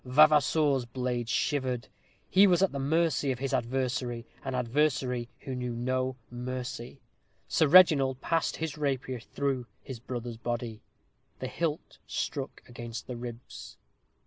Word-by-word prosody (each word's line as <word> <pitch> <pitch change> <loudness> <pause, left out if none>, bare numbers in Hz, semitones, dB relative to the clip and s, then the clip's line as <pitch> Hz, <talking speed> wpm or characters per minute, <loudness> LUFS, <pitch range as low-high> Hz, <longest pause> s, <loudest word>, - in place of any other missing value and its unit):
Vavasour's 145 0 +4
blade 120 -1 -2
shivered. 130 -3 0 0.4
He 195 +2 +6
was 180 0 +4
at 195 - +3
the 140 - -4
mercy 150 0 +2
of 130 - -2
his 135 0 -3
adversary 120 -1 -1 0.2
an 135 -1 -3
adversary 125 -1 +1
who 135 - -5
knew 125 -1 -3
no 130 +2 -1 0.2
mercy. 125 +1 -5 0.5
Sir 160 - +3
Reginald 140 -6 +6
passed 165 +2 0
his 160 -2 -4
rapier 135 -3 -1
through 130 +1 -2 0.2
his 130 -3 -7
brother's 120 -1 -5
body. 120 -2 -4 0.6
The - - -5
hilt 160 -2 -3
struck 140 -4 -3
against 120 -1 -7
his 125 - -6
ribs. 120 0 -8
130 Hz, 135 wpm, -29 LUFS, 120-145 Hz, 0.6 s, He